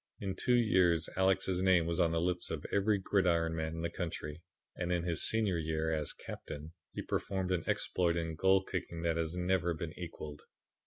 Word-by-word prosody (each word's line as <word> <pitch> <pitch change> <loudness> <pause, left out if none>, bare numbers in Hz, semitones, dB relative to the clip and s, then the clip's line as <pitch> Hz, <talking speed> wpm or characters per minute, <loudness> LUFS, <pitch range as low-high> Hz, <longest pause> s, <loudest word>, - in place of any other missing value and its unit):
In 95 -1 -3
two 125 +5 +2
years 90 -8 +3
Alex's 95 -1 +2
name 95 -3 +4
was 85 0 -1
on 85 - +4
the 80 - +1
lips 90 +1 -1
of 80 -3 -4
every 100 +1 +3
gridiron 85 -4 +2
man 80 0 -2
in 80 - -4
the 85 - 0
country, 80 -3 -4 0.3
and 90 0 -2
in 85 -1 +1
his 85 -2 0
senior 105 -6 +1
year, 80 0 -1
as 75 -2 -1
captain, 75 +3 -8 0.2
he - - -5
performed 95 -1 -1
an 90 -3 +1
exploit 85 -2 +1
in 80 -1 -2
goal 95 +4 +4
kicking 85 -3 -4
that 85 -1 +1
has 80 +1 -2
never 90 -1 +1
been 80 0 -5
equalled. 75 -4 -7
85 Hz, 195 wpm, -33 LUFS, 80-95 Hz, 0.3 s, name